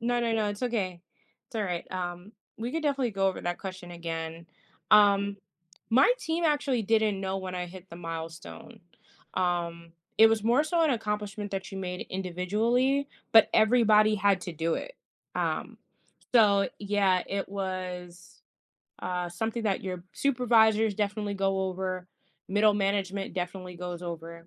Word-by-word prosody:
No, 240 +1 +1
no, 230 -1 0
no, 220 -1 +1
it's 205 +3 -5
okay. 195 -8 -1 0.5
It's 230 - -8
all 215 - 0
right, 180 -4 -3
um, 180 +2 -5 0.3
we 235 +3 -4
could 325 -1 -2
definitely 275 -5 0
go 195 0 +2
over 190 - -4
that 175 0 -3
question 185 -2 -7
again. 165 -1 -5 0.4
Um, 200 -1 +5 0.5
my 260 - +6
team 330 -4 -2
actually 285 -6 +1
didn't 215 -2 +2
know 190 0 -2
when 185 -1 -5
I 180 -1 -3
hit 185 +1 -12
the 170 - -10
milestone. 165 - -8 0.5
Um, 170 -2 -1 0.3
it 225 - +10
was 220 -1 +1
more 245 +6 +4
so 335 +2 +1
an 315 - +3
accomplishment 210 -3 -3
that 190 -1 -4
you 195 - -6
made 180 -1 -4
individually, 220 +10 0 0.2
but 225 -1 +8
everybody 215 -1 +5
had 200 -2 +2
to 175 - -5
do 165 +1 -1
it. - - -6 0.4
Um, - - -2 0.6
so, 205 -4 +5
yeah, 200 -3 +2
it 195 -1 -3
was, 185 -2 -6 0.6
uh, 180 -1 -2
something 225 +6 -3
that 200 -3 0
your 185 -2 -5
supervisors 225 -5 +3
definitely 210 0 -1
go 195 -1 0
over, 185 -1 -3 0.4
middle 210 +2 +4
management 195 -1 -1
definitely 180 0 -5
goes 175 0 -6
over, 170 -1 -7
195 Hz, 155 wpm, -28 LUFS, 180-220 Hz, 0.6 s, it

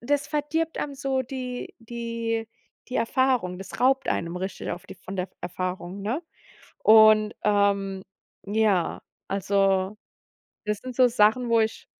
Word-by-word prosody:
das 285 +3 0
verdirbt 315 +2 -1
einem 285 - -3
so 270 -1 -1
die 255 -1 -6
die 230 -1 -3 0.4
die 250 - -7
Erfahrung, 235 -7 +1
das 195 0 -8
raubt 265 +1 +3
einem 170 +1 -1
richtig 190 +2 -4
auf 175 - -6
die - - -9
von 185 +2 -9
der 180 0 -2
Erfahrung, 180 +1 -4
ne? 235 - -2 0.6
Und, 215 0 +7
ähm, 200 -2 +1 0.4
ja, 205 -4 +1 0.3
also 195 0 +1 0.7
das 210 -1 0
sind 255 -1 -8
so 255 0 +5
Sachen, 235 +1 +3
wo 230 -1 +4
ich 220 0 -1
220 Hz, 140 wpm, -26 LUFS, 195-255 Hz, 0.7 s, Und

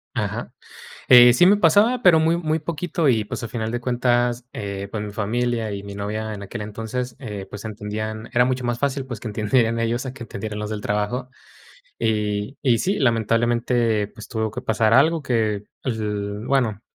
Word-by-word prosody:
Ajá, - - -3 0.6
eh, 120 -2 +9
sí 175 +9 +5
me 205 +2 +6
pasaba, 205 +8 +4
pero, 165 -5 +6
muy, 165 +1 +3
muy 160 -2 -1
poquito 165 -1 -1
y, 110 -4 +2
pues, 105 - -6
a 115 - -4
final 110 -1 -3
de 120 - -2
cuentas, 120 0 +1
eh, 100 -1 -5
pues, 105 -2 -3
mi 105 - -5
familia 115 +1 -1
y 100 0 -5
mi 100 0 -8
novia 110 +2 -3
en 100 -1 -7
aquel 105 +2 -6
entonces, 115 +4 -5
eh, 105 -7 -6
pues, 105 +2 -8
entendían 110 +1 -5
era 125 0 +4
mucho 130 0 -1
más 120 0 -1
fácil, 140 -1 -1
pues, 120 -4 -6
que - - -9
entendieran 115 +2 +1
ellos 120 +3 -1
a 130 - -6
que 120 - -9
entendieran 105 -1 -6
los 105 0 -4
del 105 -1 -3
trabajo. 115 +3 -2 0.7
Y 105 +2 -1
y 120 -4 +3
sí, 195 +3 0
lamentablemente, 115 -2 +1
pues, 110 - -12
tuvo 110 -1 -2
que 125 +4 -6
pasar 110 -2 +2
algo 155 +5 +4
que, 110 -5 0 0.2
l 105 -3 -3
bueno, 115 -6 +1
115 Hz, 190 wpm, -22 LUFS, 105-125 Hz, 0.7 s, eh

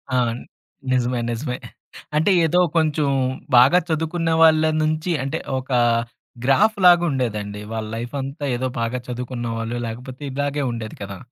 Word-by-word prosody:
అవును. 120 -1 0 0.5
నిజమే 125 -1 +1
నిజమే. 125 +2 -3 0.6
అంటే 160 +6 +3
ఏదో 175 +3 +2 0.2
కొంచెం 155 -2 +1 0.5
బాగా 135 +9 +7
చదువుకున్న 165 +1 -1
వాళ్ళ 160 -1 +6 0.2
నుంచి 155 +3 0
అంటే, 140 +4 -2 0.2
ఒక 130 - -12 0.8
గ్రాఫ్‌లాగుండేదండి. 135 - +3
వాళ్ళ 110 -1 -3
లైఫ్ 120 +3 -5
అంతా 140 +2 -5
ఏదో 130 +1 -1
బాగా 120 +2 -1
చదువుకున్నవాళ్ళు 120 -2 -4
లేకపోతే 125 +4 -8
ఇలాగే 145 +1 -1
ఉండేది 110 -2 -6
కదా! 100 -1 -6
130 Hz, 120 wpm, -22 LUFS, 120-155 Hz, 0.8 s, బాగా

